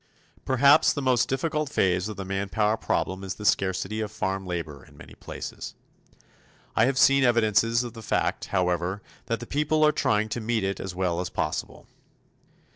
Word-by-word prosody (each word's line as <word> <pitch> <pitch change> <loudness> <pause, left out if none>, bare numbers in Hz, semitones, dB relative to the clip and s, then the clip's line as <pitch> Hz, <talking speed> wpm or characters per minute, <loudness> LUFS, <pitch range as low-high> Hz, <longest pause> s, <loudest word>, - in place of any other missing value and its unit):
Perhaps 140 +3 +5
the 145 - -3
most 125 -2 +2
difficult 150 +2 -1
phase 95 -4 +1
of 105 - -7
the 95 - -5
manpower 100 +3 0
problem 95 -3 -2
is 95 -1 -4
the 105 - -8
scarcity 95 +2 0
of 105 -1 -4
farm 95 -2 -3
labor 80 -6 -5
in - - -19
many - - -13
places. - - -8 1.0
I 110 - +4
have 130 +1 0
seen 135 0 +5
evidences 115 -1 +3
of 120 -2 -7
the 115 - -10
fact, 105 - -1
however, 90 +1 -1 0.2
that 115 -1 -1
the 120 - -7
people 150 +3 +1
are 150 - +5
trying 105 -6 +1
to 120 - -3
meet 110 -1 -1
it 95 0 -2
as 95 -2 -6
well 90 -2 -1
as 90 - -3
possible. - - -4
110 Hz, 180 wpm, -26 LUFS, 95-125 Hz, 1.0 s, Perhaps